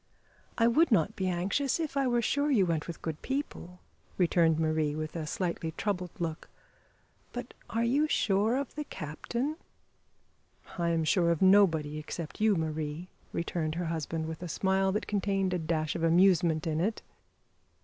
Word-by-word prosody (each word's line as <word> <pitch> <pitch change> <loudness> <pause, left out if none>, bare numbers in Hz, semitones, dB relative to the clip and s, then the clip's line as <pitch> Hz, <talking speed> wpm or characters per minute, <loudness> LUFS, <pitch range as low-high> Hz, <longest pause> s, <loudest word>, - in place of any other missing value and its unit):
"I 230 - +4
would 285 +7 +4
not 195 0 +3
be 190 - -1
anxious 195 - 0
if 315 -3 -3
I 275 -1 +2
were 240 -1 +1
sure 285 +5 +1
you 220 -9 +4
went 165 -3 -1
with 170 - -7
good 160 -2 -4
people," 265 -10 -4 0.4
returned 170 -3 +3
Marie, 155 -2 +1
with 155 +1 -4
a 160 -2 -3
slightly 170 -2 -2
troubled 185 -1 -2
look; 165 -2 -4 0.8
"but 245 0 -6 0.2
are 230 +1 0
you 280 +6 +2
sure 210 -3 +2
of 275 -2 -3
the 300 - -4
captain?" 240 - -4 1.2
"I 170 0 +1
am 165 -1 +1
sure 170 +2 +3
of 170 +1 +1
nobody 165 -6 +4
except 155 +4 -7
you, 215 -2 +4
Marie," 160 +1 -3 0.2
returned 165 -2 -2
her 175 +1 -2
husband, 160 0 -3
with 160 +1 -6
a 180 - -4
smile 190 +2 +1
that 210 - -1
contained 195 -2 0
a 180 - 0
dash 155 -1 -1
of 170 - -3
amusement 170 -1 +4
in 160 -1 0
it. 215 +5 -1
180 Hz, 170 wpm, -30 LUFS, 160-215 Hz, 1.2 s, I